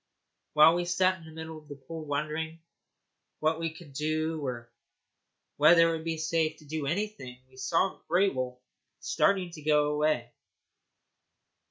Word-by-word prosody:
While 155 Hz, +2 st, +7 dB
we 175 Hz, 0 st, 0 dB
sat 185 Hz, +1 st, +2 dB
in 165 Hz, -, -14 dB
the 160 Hz, -, -11 dB
middle 160 Hz, 0 st, -8 dB
of 150 Hz, -, -21 dB
the 145 Hz, -, -8 dB
pool 155 Hz, +4 st, -8 dB
wondering 155 Hz, +3 st, -3 dB, 0.8 s
what 155 Hz, +1 st, +1 dB
we 165 Hz, -1 st, -2 dB
could 160 Hz, -4 st, -13 dB
do 155 Hz, +2 st, -1 dB
or 120 Hz, -3 st, -5 dB, 0.8 s
whether 165 Hz, +3 st, +7 dB
it 165 Hz, -, 0 dB
would 160 Hz, -, -9 dB
be 165 Hz, 0 st, -2 dB
safe 160 Hz, 0 st, 0 dB
to 155 Hz, -, -17 dB
do 150 Hz, -1 st, -3 dB
anything, 170 Hz, -8 st, -3 dB
we 130 Hz, 0 st, -21 dB
saw 165 Hz, +8 st, 0 dB
Grey 185 Hz, +4 st, +3 dB
Wolf 130 Hz, -5 st, -4 dB, 0.4 s
start 200 Hz, -, +2 dB
to 160 Hz, -, -10 dB
go 150 Hz, 0 st, +3 dB
away. 150 Hz, -6 st, 0 dB
155 Hz, 160 wpm, -29 LUFS, 145-165 Hz, 0.8 s, While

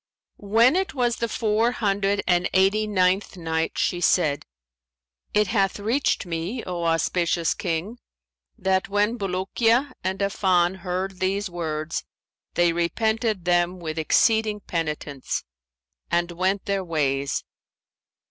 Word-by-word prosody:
When 225 Hz, +7 st, +4 dB
it 380 Hz, -1 st, -1 dB
was 240 Hz, -2 st, +1 dB
the 230 Hz, -, -2 dB
Four 220 Hz, +2 st, +1 dB
Hundred 200 Hz, -2 st, 0 dB
and 175 Hz, 0 st, +2 dB
Eighty 195 Hz, +3 st, +3 dB
ninth 190 Hz, -1 st, +1 dB
Night, 160 Hz, -1 st, -2 dB
She 175 Hz, -, 0 dB
said, 150 Hz, -6 st, +2 dB, 0.8 s
It 210 Hz, 0 st, +3 dB
hath 195 Hz, -3 st, +1 dB
reached 230 Hz, +2 st, 0 dB
me, 175 Hz, +8 st, -3 dB
O 175 Hz, -2 st, -3 dB
auspicious 165 Hz, +1 st, +1 dB
King, 185 Hz, +7 st, -3 dB, 0.6 s
that 190 Hz, -2 st, 0 dB
"when 205 Hz, +3 st, +1 dB
Bulukiya 225 Hz, +8 st, +1 dB
and 190 Hz, +1 st, -1 dB
Affan 190 Hz, -2 st, +2 dB
heard 185 Hz, +1 st, -4 dB
these 195 Hz, +1 st, -1 dB
words, 155 Hz, -2 st, -3 dB, 0.5 s
they 175 Hz, -1 st, +3 dB
repented 220 Hz, +3 st, 0 dB
them 175 Hz, +1 st, +2 dB
with 160 Hz, -1 st, -4 dB
exceeding 215 Hz, +5 st, +2 dB
penitence 150 Hz, -6 st, -3 dB, 0.7 s
and 175 Hz, 0 st, +1 dB
went 185 Hz, +3 st, -1 dB
their 200 Hz, -1 st, -1 dB
ways. 140 Hz, -5 st, -1 dB
190 Hz, 120 wpm, -24 LUFS, 170-210 Hz, 0.8 s, When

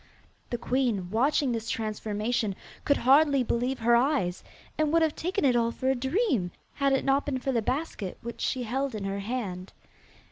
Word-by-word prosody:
The 240 Hz, -, -2 dB
queen, 235 Hz, -7 st, -1 dB
watching 265 Hz, +4 st, +2 dB
this 230 Hz, -1 st, -3 dB
transformation, 215 Hz, -1 st, -2 dB, 0.3 s
could 285 Hz, -, +3 dB
hardly 275 Hz, +1 st, +4 dB
believe 245 Hz, +3 st, -1 dB
her 235 Hz, +1 st, +5 dB
eyes, 235 Hz, -9 st, +1 dB, 0.3 s
and 310 Hz, -1 st, +1 dB
would 330 Hz, 0 st, +4 dB
have 315 Hz, -2 st, +1 dB
taken 360 Hz, -1 st, -1 dB
it 255 Hz, -3 st, +4 dB
all 235 Hz, -1 st, +2 dB
for 260 Hz, +2 st, 0 dB
a -, -, +1 dB
dream, 265 Hz, -, 0 dB, 0.2 s
had 275 Hz, -1 st, +1 dB
it 270 Hz, -, +1 dB
not 275 Hz, +1 st, +3 dB
been 280 Hz, -3 st, -2 dB
for 265 Hz, +1 st, -2 dB
the 235 Hz, -3 st, +1 dB
basket 250 Hz, -, -3 dB
which 235 Hz, 0 st, -7 dB
she 255 Hz, -2 st, -1 dB
held 260 Hz, +2 st, -2 dB
in 210 Hz, -, -4 dB
her 195 Hz, 0 st, -2 dB
hand. 195 Hz, -4 st, -4 dB
250 Hz, 185 wpm, -28 LUFS, 220-275 Hz, 0.3 s, her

